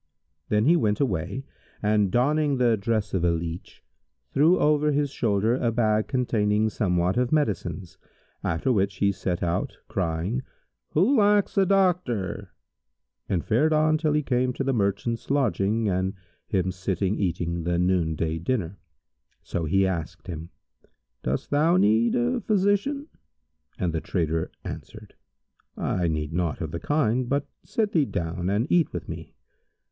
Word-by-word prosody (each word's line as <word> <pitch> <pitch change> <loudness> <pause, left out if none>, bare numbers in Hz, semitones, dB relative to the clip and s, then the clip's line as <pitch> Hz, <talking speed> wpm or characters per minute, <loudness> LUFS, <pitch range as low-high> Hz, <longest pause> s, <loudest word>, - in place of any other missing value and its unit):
Then 105 +1 +2
he 165 +5 +5
went 105 -11 +1
away 100 - -1 0.4
and, 105 -1 +2
donning 145 +4 +2
the 120 -2 +3
dress 110 0 -1
of 95 -3 0
a 85 - +4
leach, 85 +1 -4 0.5
threw 160 +6 +5
over 150 0 +3
his 145 -1 0
shoulder 110 -3 +1
a 120 -2 0
bag 110 -2 +1
containing 110 -5 +1
somewhat 90 -3 0
of 125 0 +1
medicines, 95 - -1 0.4
after 85 +10 0
which 100 -2 +1
he 100 +1 +2
set 95 -2 -3
out, 85 0 -1
crying, 90 +7 -1 0.5
'Who 200 - +4
lacks 205 -3 +3
a 195 -2 +3
doctor?' 180 - +1 0.8
and 90 -4 0
fared 150 +8 +2
on 155 0 +3
till 155 -2 +1
he 150 0 +1
came 125 -1 +1
to 135 - -3
the 135 0 0
merchant's 115 +2 -1
lodging 115 -5 +1
and 95 +1 0 0.3
him 95 -2 0
sitting 95 +2 -1
eating 85 -3 -1
the 85 +1 0
noon 90 -3 +1
day 80 +1 -2
dinner. 95 -2 -2 0.6
So 85 - -3
he 95 +5 +3
asked 85 -2 -4
him, 85 -2 -6 0.7
"Dost 65 +3 -3
thou 160 +5 +4
need 110 - +3
thee 120 - +1
a - - -4
physician?"; 205 +8 +1 0.7
and 90 -3 -1
the 80 - -1
trader 80 -2 -1
answered, - - -9 0.6
"I 90 -2 0
need 75 -1 -2
naught 85 -2 -1
of 80 -4 -4
the 85 - -4
kind, 125 - +1
but 140 0 0 0.2
sit 215 -2 -1
thee 155 -4 +3
down 90 -3 -3
and 105 +4 +1
eat 175 -3 +3
with - - -5
me." - - -8
105 Hz, 155 wpm, -25 LUFS, 90-140 Hz, 0.8 s, he